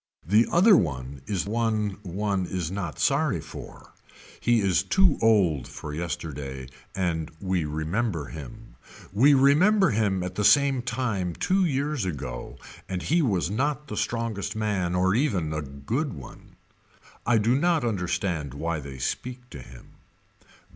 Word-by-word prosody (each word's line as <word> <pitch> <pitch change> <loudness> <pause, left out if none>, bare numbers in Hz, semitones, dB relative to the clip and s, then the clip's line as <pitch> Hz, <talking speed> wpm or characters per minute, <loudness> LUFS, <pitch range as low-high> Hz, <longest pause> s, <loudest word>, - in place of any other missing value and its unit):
The 105 +7 +4
other 195 +4 +6
one 65 - -1
is 95 -4 -1
one 110 -2 -1
one 100 0 -2
is 90 -3 -3
not 95 -5 -4
sorry - - +1
for. - - -11 0.5
He 120 -1 +3
is 95 -3 +2
too 160 - +3
old 95 - +3
for 75 - -8
yesterday 75 -6 -5 0.3
and 85 -4 -1
we 95 -4 -1
remember 80 +3 -2
him. 110 - -10 0.4
We 140 +8 +6
remember 180 +9 +5
him 100 -4 +1
at 90 - -4
the 105 - -2
same 140 +2 +5
time 115 -8 -2
two 190 0 +2
years 145 - -1
ago 65 -9 -5 0.3
and 90 -2 -3
he 170 +3 +2
was 95 - 0
not 145 +6 -1
the - - -4
strongest 115 -3 -2
man 100 -5 -1
or 95 +1 +2
even 100 - 0
the 75 -1 -2
good 75 - -3
one. 70 -6 -12 0.7
I 120 - +3
do 110 +3 +2
not 160 0 +2
understand 90 - -2
why 80 +2 -2
they 70 -2 -8
speak 125 - -4
to 70 - -8
him. 60 -1 -14
100 Hz, 145 wpm, -26 LUFS, 80-120 Hz, 0.7 s, other